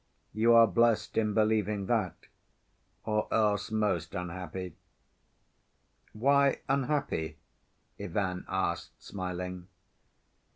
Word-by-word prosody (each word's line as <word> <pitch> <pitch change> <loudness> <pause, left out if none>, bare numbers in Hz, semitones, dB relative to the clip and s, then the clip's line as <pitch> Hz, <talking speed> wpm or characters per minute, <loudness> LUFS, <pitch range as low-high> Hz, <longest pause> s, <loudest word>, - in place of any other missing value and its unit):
"You 115 +3 +4
are 115 0 +9
blessed 115 +2 +2
in 105 -2 +1
believing 105 -2 +1
that, 105 -5 0 0.9
or 105 -1 -1
else 105 -2 +1
most 100 -7 -1
unhappy." 90 +1 -5 1.4
"Why 140 +4 +3
unhappy?" 135 - -1 0.6
Ivan 90 0 -2
asked 90 -3 -2
smiling. 90 -1 -5
105 Hz, 85 wpm, -30 LUFS, 90-110 Hz, 1.4 s, are